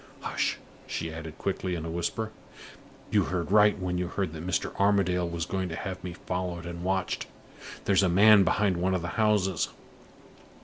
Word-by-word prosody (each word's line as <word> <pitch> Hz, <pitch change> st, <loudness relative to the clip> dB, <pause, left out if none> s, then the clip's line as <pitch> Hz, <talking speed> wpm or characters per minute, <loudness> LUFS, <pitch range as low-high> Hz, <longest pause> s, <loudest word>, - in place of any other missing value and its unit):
Hush!" -, -, -1 dB, 0.3 s
she 80 Hz, -1 st, -3 dB
added 80 Hz, -1 st, -8 dB
quickly, 95 Hz, -2 st, -2 dB
in 80 Hz, -1 st, -4 dB
a 80 Hz, -, -4 dB
whisper. 110 Hz, +6 st, -2 dB, 0.8 s
"You -, -, +3 dB
heard 90 Hz, 0 st, -2 dB
right 105 Hz, 0 st, +6 dB
when 90 Hz, -2 st, -2 dB
you 90 Hz, -, -1 dB
heard 90 Hz, -2 st, -2 dB
that 80 Hz, 0 st, -7 dB
Mr. 90 Hz, -, -1 dB
Armadale 95 Hz, -3 st, +2 dB
was 85 Hz, -1 st, -3 dB
going 95 Hz, -1 st, -2 dB
to 80 Hz, -, -4 dB
have 95 Hz, +1 st, -5 dB
me 90 Hz, -1 st, -5 dB
followed 90 Hz, -1 st, -4 dB
and 85 Hz, 0 st, -6 dB
watched. 95 Hz, 0 st, -1 dB, 0.6 s
There's 100 Hz, -1 st, +4 dB
a 95 Hz, -, +3 dB
man 100 Hz, +3 st, +7 dB
behind 100 Hz, -2 st, +2 dB
one 95 Hz, +2 st, +1 dB
of 90 Hz, -, -2 dB
the 90 Hz, -, -3 dB
houses. 105 Hz, -6 st, +1 dB
90 Hz, 180 wpm, -28 LUFS, 85-100 Hz, 0.8 s, man